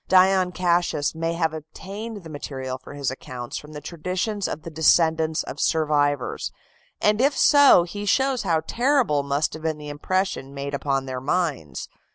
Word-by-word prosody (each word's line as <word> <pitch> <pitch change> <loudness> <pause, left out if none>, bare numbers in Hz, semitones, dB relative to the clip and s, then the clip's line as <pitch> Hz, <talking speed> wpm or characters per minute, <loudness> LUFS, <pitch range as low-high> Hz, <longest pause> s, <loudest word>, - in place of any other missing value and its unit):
Dion 185 0 +4
Cassius 175 -4 +1
may 165 +1 -2
have 165 -2 0
obtained 195 +7 -7
the 165 - -10
material 130 -3 -5
for 140 - -11
his 140 -2 -1
accounts 125 -2 -7
from 150 +1 -13
the 150 - -7
traditions 185 +6 -2
of 155 - -5
the 165 - -7
descendants 160 0 +3
of - - -8
survivors, 145 -4 +1 0.5
and 210 +2 +2
if 280 +2 +2
so 285 - +7
he 205 +4 -6
shows 265 +2 +2
how 160 -2 +1
terrible 240 - +2
must 140 +2 -1
have 160 - -7
been 160 -1 -1
the 150 -1 -8
impression 145 -2 -2
made 140 +1 -4
upon 135 -1 -1
their 130 -1 -5
minds. 145 - -2
160 Hz, 170 wpm, -24 LUFS, 145-185 Hz, 0.5 s, so